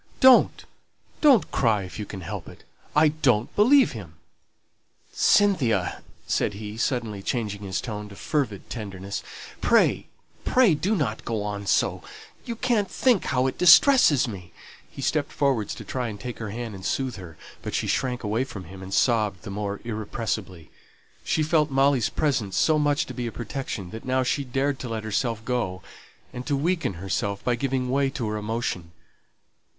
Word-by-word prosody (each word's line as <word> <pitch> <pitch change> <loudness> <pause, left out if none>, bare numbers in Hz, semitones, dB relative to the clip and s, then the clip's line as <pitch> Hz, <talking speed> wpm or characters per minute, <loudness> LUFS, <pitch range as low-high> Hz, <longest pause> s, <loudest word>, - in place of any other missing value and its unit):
Don't, 260 -1 +6 0.6
don't 275 -9 +5
cry 110 -6 +2
if 90 +3 -9
you 105 - -5
can 95 - -7
help 85 - -6
it; - - -15 0.3
I 155 +1 +6
don't 130 -7 +1
believe 255 +6 +5
him." 95 -9 -9 1.0
"Cynthia," 125 - +2 0.2
said 100 - 0
he, 105 0 -7
suddenly 115 -4 -2
changing 105 -2 -3
his 95 -2 -3
tone 105 -2 -6
to 100 - -11
fervid 120 -6 -2
tenderness, 100 -3 -6 0.4
"pray, - - +3 0.4
pray 250 -8 +4
do 190 +8 0
not 120 - -2
go 110 -3 -2
on 100 -1 -4
so; - - +1 0.4
you 235 - -4
can't 230 -4 0
think 245 -7 +2
how 125 0 +1
it 130 - -2
distresses 175 - +6
me!" 90 -7 -8 0.4
He - - -8
stepped - - 0
forward 130 -8 0
to - - -6
try 125 -2 -3
and 105 -2 -7
take 125 +3 -6
her 110 -2 -4
hand 115 +1 -5
and 95 -1 -9
soothe 130 +4 -2
her; 85 -5 -10 0.2
but - - -4
she - - 0
shrank 125 -2 -1
away 110 +4 0
from 100 -8 -8
him, 95 +2 -11
and 95 0 -8
sobbed 105 -4 +1
the 100 - -7
more 100 0 -4
irrepressibly. 110 -6 -4 0.5
She 155 - +1
felt 155 -1 +2
Molly's 135 -3 +3
presence 125 -10 -1
so 155 -1 +3
much 145 0 +1
to - - -8
be 125 -2 -3
a - - -4
protection 115 -5 -5
that 110 - -8
now 130 0 +1
she 140 +3 0
dared 135 +2 -1
to 125 - -5
let 110 -1 -3
herself 110 +1 -2
go, 105 -8 -2 0.5
and 125 -1 -5
to 145 - +1
weaken 165 - 0
herself 95 +3 -3
by 125 - +1
giving 125 0 -1
way 135 0 +2
to 130 -5 -4
her 105 - -2
emotion. 105 -6 -3
120 Hz, 175 wpm, -25 LUFS, 105-140 Hz, 1.0 s, Don't